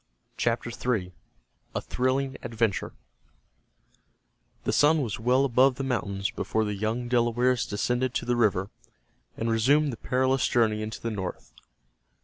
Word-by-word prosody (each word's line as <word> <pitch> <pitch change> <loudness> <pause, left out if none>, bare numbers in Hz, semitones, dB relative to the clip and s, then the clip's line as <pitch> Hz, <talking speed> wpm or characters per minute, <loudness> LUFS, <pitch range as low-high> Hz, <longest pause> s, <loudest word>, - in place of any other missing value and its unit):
CHAPTER 120 0 -1 0.2
III—A 90 - -9
THRILLING 130 +1 -1
ADVENTURE 115 -3 -1 1.7
The - - -1
sun 150 0 +4
was 110 -4 -4
well 125 +4 +3
above 130 +1 +4
the 135 - -4
mountains 100 -7 -2
before 110 0 -1
the 105 - -2
young 110 +4 -2
Delawares 120 +1 +2
descended 125 +4 -1
to - - -1
the 120 - +1
river, 100 -4 +1 0.7
and 115 0 -1
resumed 140 +6 +3
the - - -7
perilous 130 +2 +1
journey 110 -3 +2
into 110 +1 -5
the 115 - -2
north. 95 -4 -6
120 Hz, 130 wpm, -27 LUFS, 110-130 Hz, 1.7 s, sun